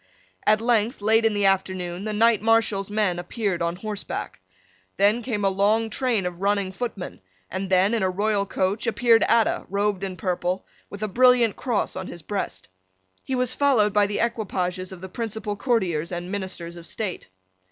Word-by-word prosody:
At 215 Hz, +1 st, +5 dB
length, 235 Hz, 0 st, +1 dB
late 220 Hz, +2 st, +3 dB
in 220 Hz, -2 st, +2 dB
the 205 Hz, -1 st, +1 dB
afternoon, 185 Hz, -1 st, 0 dB
the 215 Hz, -, -2 dB
Knight 220 Hz, 0 st, +3 dB
Marshal's 220 Hz, -3 st, +2 dB
men 205 Hz, -4 st, 0 dB
appeared 185 Hz, 0 st, -2 dB
on 170 Hz, 0 st, 0 dB
horseback. 210 Hz, +2 st, -5 dB, 0.6 s
Then 205 Hz, +4 st, +4 dB
came 215 Hz, -5 st, -2 dB
a -, -, +5 dB
long 210 Hz, +4 st, +2 dB
train 240 Hz, -7 st, 0 dB
of 180 Hz, 0 st, -5 dB
running 200 Hz, -1 st, +1 dB
footmen; 200 Hz, -, -5 dB, 0.3 s
and 190 Hz, +1 st, -3 dB
then, 190 Hz, +3 st, +3 dB
in 230 Hz, -, +1 dB
a 190 Hz, -, +2 dB
royal 200 Hz, +1 st, 0 dB
coach, 195 Hz, +5 st, -1 dB
appeared 230 Hz, 0 st, +4 dB
Adda, 230 Hz, -2 st, +2 dB
robed 200 Hz, 0 st, 0 dB
in 190 Hz, -2 st, -4 dB
purple, 180 Hz, +1 st, -2 dB, 0.2 s
with 200 Hz, +1 st, -7 dB
a -, -, 0 dB
brilliant 245 Hz, 0 st, +4 dB
cross 240 Hz, -5 st, -1 dB
on -, -, -5 dB
his 170 Hz, -2 st, -9 dB
breast. 175 Hz, -, -4 dB, 0.6 s
He 265 Hz, -, -2 dB
was 250 Hz, 0 st, 0 dB
followed 240 Hz, -8 st, +3 dB
by 205 Hz, -1 st, +4 dB
the 205 Hz, -, -2 dB
equipages 185 Hz, -5 st, -2 dB
of 185 Hz, -2 st, -10 dB
the 190 Hz, -, -6 dB
principal 220 Hz, 0 st, -4 dB
courtiers 190 Hz, -, 0 dB
and 175 Hz, +1 st, -5 dB
ministers 185 Hz, -4 st, -4 dB
of 170 Hz, -1 st, -10 dB
state. 200 Hz, -, -4 dB
205 Hz, 180 wpm, -24 LUFS, 185-225 Hz, 0.6 s, At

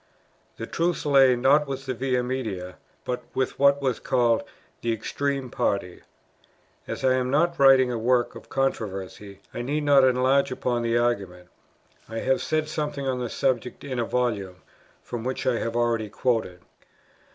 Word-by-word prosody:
The 115 Hz, -, -5 dB
truth 170 Hz, +6 st, -1 dB
lay, 135 Hz, -3 st, +5 dB
not 140 Hz, +4 st, +3 dB
with 135 Hz, 0 st, -5 dB
the 130 Hz, -, -2 dB
Via 125 Hz, 0 st, 0 dB
Media, 110 Hz, -8 st, -4 dB, 0.3 s
but 125 Hz, 0 st, -2 dB
with 130 Hz, -1 st, -1 dB
what 140 Hz, 0 st, +4 dB
was 130 Hz, -4 st, 0 dB
called 120 Hz, -1 st, +2 dB, 0.4 s
"the 115 Hz, -, 0 dB
extreme 135 Hz, +3 st, -2 dB
party." 90 Hz, -3 st, -2 dB, 0.9 s
As -, -, -4 dB
I 130 Hz, -, +4 dB
am 130 Hz, 0 st, 0 dB
not 170 Hz, +4 st, +1 dB
writing 135 Hz, -2 st, +6 dB
a 120 Hz, -, -2 dB
work 120 Hz, +1 st, +1 dB
of -, -, -12 dB
controversy, 100 Hz, -6 st, -3 dB
I -, -, -4 dB
need 145 Hz, +5 st, -2 dB
not 140 Hz, -2 st, +5 dB
enlarge 130 Hz, +2 st, +3 dB
upon 125 Hz, -1 st, -1 dB
the 115 Hz, 0 st, +1 dB
argument; 100 Hz, -7 st, -1 dB, 0.6 s
I 115 Hz, -, -5 dB
have 130 Hz, +3 st, +1 dB
said 155 Hz, -1 st, -1 dB
something 150 Hz, -3 st, -3 dB
on 130 Hz, -1 st, -1 dB
the 120 Hz, -1 st, -3 dB
subject 125 Hz, -2 st, -1 dB
in 130 Hz, -3 st, -4 dB
a -, -, +1 dB
Volume, 100 Hz, -8 st, -2 dB, 0.4 s
from 120 Hz, -2 st, -6 dB
which 130 Hz, +1 st, -3 dB
I 125 Hz, -3 st, +1 dB
have 115 Hz, 0 st, -3 dB
already 115 Hz, -2 st, 0 dB
quoted. 105 Hz, -4 st, -1 dB
125 Hz, 165 wpm, -25 LUFS, 115-135 Hz, 0.9 s, writing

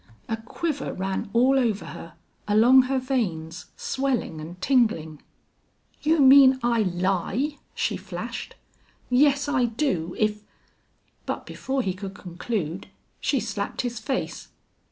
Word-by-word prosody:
A 225 Hz, -, -1 dB
quiver 280 Hz, +7 st, -4 dB
ran 190 Hz, +1 st, -3 dB
all 255 Hz, +4 st, +4 dB
over 220 Hz, -6 st, 0 dB
her, 165 Hz, -1 st, -10 dB, 0.3 s
along 230 Hz, +5 st, +6 dB
her 270 Hz, -, +1 dB
veins, 185 Hz, -11 st, -2 dB
swelling 260 Hz, -, -2 dB
and 170 Hz, +4 st, -9 dB
tingling. 185 Hz, -, +1 dB, 0.8 s
"You 315 Hz, +1 st, +2 dB
mean 265 Hz, -1 st, +8 dB
I 235 Hz, -1 st, +2 dB
lie?" 195 Hz, -, -1 dB, 0.2 s
she -, -, -1 dB
flashed. -, -, -6 dB, 0.6 s
"Yes, 280 Hz, +2 st, +4 dB
I 270 Hz, -4 st, +2 dB
do 220 Hz, -, -1 dB
if 210 Hz, -1 st, 0 dB, 0.4 s
" -, -, -42 dB
But -, -, -3 dB
before 265 Hz, -1 st, -2 dB
he 190 Hz, -, -1 dB
could 195 Hz, +1 st, -7 dB
conclude 180 Hz, -1 st, -4 dB, 0.3 s
she 275 Hz, -, +1 dB
slapped 200 Hz, -3 st, -3 dB
his 240 Hz, -2 st, -4 dB
face. 260 Hz, +4 st, -3 dB
230 Hz, 130 wpm, -25 LUFS, 185-265 Hz, 0.8 s, mean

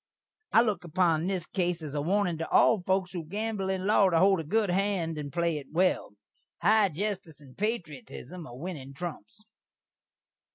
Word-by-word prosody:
I 225 Hz, -, +7 dB
look 210 Hz, -6 st, -1 dB
upon 170 Hz, -1 st, +1 dB
this 185 Hz, -3 st, -1 dB
case 175 Hz, -3 st, -1 dB
as 145 Hz, -2 st, -6 dB
a 145 Hz, -, -1 dB
warnin' 180 Hz, 0 st, +1 dB
to 165 Hz, -, -3 dB
all 220 Hz, -4 st, +5 dB
foaks 185 Hz, 0 st, 0 dB
who 175 Hz, -3 st, -4 dB
gambel 205 Hz, +3 st, -3 dB
in 190 Hz, -1 st, -1 dB
law 200 Hz, -2 st, +5 dB
to 170 Hz, -, +2 dB
hold 190 Hz, +1 st, +5 dB
a -, -, -3 dB
good 205 Hz, +4 st, +1 dB
hand 185 Hz, -4 st, 0 dB
and 145 Hz, -1 st, -5 dB
play 170 Hz, 0 st, 0 dB
it 140 Hz, -, -12 dB
well. 180 Hz, -, +1 dB, 0.5 s
High 210 Hz, +1 st, +5 dB
jestice 190 Hz, -2 st, -4 dB
and 135 Hz, -4 st, -16 dB
patriotism 190 Hz, -4 st, -5 dB
are 120 Hz, -, -10 dB
winning 140 Hz, -4 st, -7 dB
trumps. 175 Hz, +6 st, -7 dB
180 Hz, 175 wpm, -29 LUFS, 160-200 Hz, 0.5 s, I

